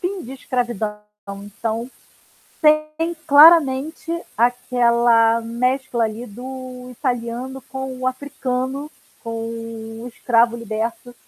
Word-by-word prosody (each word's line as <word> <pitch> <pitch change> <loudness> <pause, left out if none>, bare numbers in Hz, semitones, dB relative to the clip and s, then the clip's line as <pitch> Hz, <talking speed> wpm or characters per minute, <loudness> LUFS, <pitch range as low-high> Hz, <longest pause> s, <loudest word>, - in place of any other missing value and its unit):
fim 365 0 -3
de 260 - -8
escravidão. 240 -5 -2 0.3
Então, 220 +4 -4 0.7
tem 305 +2 +2
claramente 300 0 +6 0.3
aquela 235 -1 +3
mescla, 240 +1 0
ali, 220 +3 -4
do 250 +2 -8
italiano 250 +1 -3
com 265 -1 -6
o 255 - -3
africano, 260 +1 -3 0.3
com 230 - -6
o 230 0 -6
escravo 235 -1 +3
liberto 230 +2 -4
245 Hz, 95 wpm, -21 LUFS, 230-265 Hz, 0.7 s, claramente